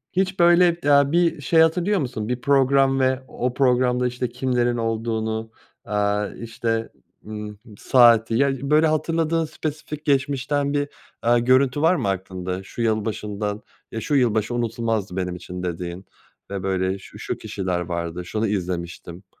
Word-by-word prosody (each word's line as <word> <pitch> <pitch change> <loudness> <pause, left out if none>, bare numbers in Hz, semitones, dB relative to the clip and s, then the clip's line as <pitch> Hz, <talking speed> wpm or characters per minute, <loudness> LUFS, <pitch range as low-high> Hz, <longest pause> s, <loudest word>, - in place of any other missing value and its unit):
H 190 - +4
hiç 190 0 -3
böyle, 175 0 +5
aaa, 140 0 +5
bir 170 -3 +2
şey 160 +5 +4
hatırlıyor 175 +5 +2
musun, 120 -5 -3
bir 125 0 -2
program, 135 -1 +3
ve 130 0 +1
o 125 0 -3
programda, 125 -1 +2
işte, 125 -1 -3
kimlerin 120 -1 0
olduğunu, 110 -1 -2 0.3
aaa, 105 0 0
işte, 115 -1 -3 0.4
ııı, 105 -1 -7 0.2
saati, 115 -3 +5
ya, 140 +2 +3 0.2
böyle 155 +1 +5
hatırladığın 160 +1 0
spesifik 150 0 -6
geçmişten 140 +1 0
bir, 145 0 0 0.3
aaa, 120 +1 +3
görüntü 130 +3 +3
var 165 +3 +4
mı 100 - -1
aklında, 95 -1 -4
şu 120 - -7
yılbaşından 105 -1 -2 0.3
"Ya, 115 - -4
şu 145 - -1
yılbaşı 115 -3 +2
unutulmazdı 115 -4 -2
benim 90 -1 -2
için." 90 0 -7
dediğin 90 +1 -5 0.5
ve 95 -2 -4
böyle 95 0 -1
"Şu, - - -13
şu - - -4
kişiler 90 -2 -3
vardı, 85 0 -4
şunu 110 +3 -1
izlemiştim." 90 -1 -4
120 Hz, 150 wpm, -23 LUFS, 105-140 Hz, 0.5 s, böyle